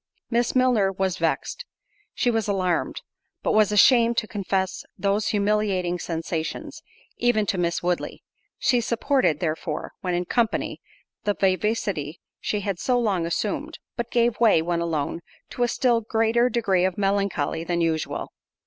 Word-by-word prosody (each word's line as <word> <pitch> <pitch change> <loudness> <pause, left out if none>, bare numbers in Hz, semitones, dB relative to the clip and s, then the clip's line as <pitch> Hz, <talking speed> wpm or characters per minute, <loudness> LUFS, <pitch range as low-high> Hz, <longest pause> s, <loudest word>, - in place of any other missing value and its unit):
Miss 240 +2 +1
Milner 245 -7 +3
was 190 -1 -1
vext—she 415 - -3
was 225 -2 0
alarmed—but 185 -4 -2
was 215 -1 +4
ashamed 235 +3 +5
to 215 - 0
confess 195 -2 -2
those 200 +1 0
humiliating 200 -4 +1
sensations, 165 -1 -4 0.4
even 240 -3 +2
to 190 -2 -1
Miss 170 0 0
Woodley—she 180 +7 -2
supported, 235 - +1
therefore, 160 -1 -3
when 180 -2 -1
in 175 0 -1
company, 230 +3 0 0.4
the 205 -1 0
vivacity 185 -5 0 0.2
she 210 - -2
had 195 -3 -3
so 250 -1 +1
long 195 -8 0
assumed; 220 - -2 0.2
but 235 -1 -3
gave 235 -1 +1
way, 225 -7 +5
when 170 +1 -1
alone, 165 -2 -2 0.3
to - - -6
a 245 - +4
still 240 -1 +2
greater 225 +2 +2
degree 200 -6 +1
of 185 -1 0
melancholy 195 -6 0
than 170 0 -1
usual. 160 -2 -1
200 Hz, 140 wpm, -24 LUFS, 175-235 Hz, 0.4 s, ashamed